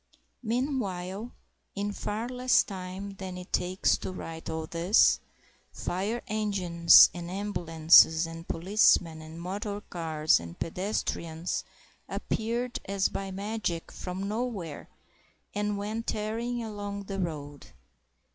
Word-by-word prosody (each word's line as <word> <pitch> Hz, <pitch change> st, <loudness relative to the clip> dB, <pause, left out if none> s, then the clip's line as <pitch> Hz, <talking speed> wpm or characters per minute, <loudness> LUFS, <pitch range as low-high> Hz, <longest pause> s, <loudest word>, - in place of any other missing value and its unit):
Meanwhile, 225 Hz, -4 st, -2 dB, 0.4 s
in 205 Hz, +1 st, -1 dB
far 215 Hz, +3 st, -3 dB
less 250 Hz, -1 st, +3 dB
time 190 Hz, 0 st, -6 dB
than 185 Hz, -1 st, -6 dB
it 180 Hz, +1 st, -10 dB
takes 185 Hz, +2 st, +2 dB
to -, -, -4 dB
write 165 Hz, -3 st, -7 dB
all 160 Hz, 0 st, -3 dB
this, 170 Hz, +6 st, +4 dB, 0.5 s
fire 205 Hz, +7 st, -2 dB
engines 190 Hz, -6 st, +6 dB
and 175 Hz, -1 st, -6 dB
ambulances, 165 Hz, -4 st, +5 dB
and 165 Hz, +1 st, -8 dB
policemen 170 Hz, -3 st, +3 dB
and 160 Hz, +1 st, -10 dB
motor 200 Hz, +4 st, -4 dB
cars 160 Hz, -5 st, +1 dB
and 85 Hz, 0 st, -9 dB
pedestrians 170 Hz, -2 st, -2 dB, 0.5 s
appeared 235 Hz, +2 st, -2 dB
as 195 Hz, 0 st, +1 dB
by 195 Hz, 0 st, -4 dB
magic 195 Hz, -3 st, -3 dB
from 190 Hz, +2 st, -5 dB
nowhere 210 Hz, -, -4 dB, 0.6 s
and 205 Hz, 0 st, -1 dB
went 215 Hz, +3 st, -4 dB
tearing 230 Hz, +3 st, -2 dB
along 205 Hz, -2 st, -5 dB
the 195 Hz, 0 st, -5 dB
road. 145 Hz, -5 st, -5 dB
195 Hz, 115 wpm, -29 LUFS, 170-210 Hz, 0.6 s, engines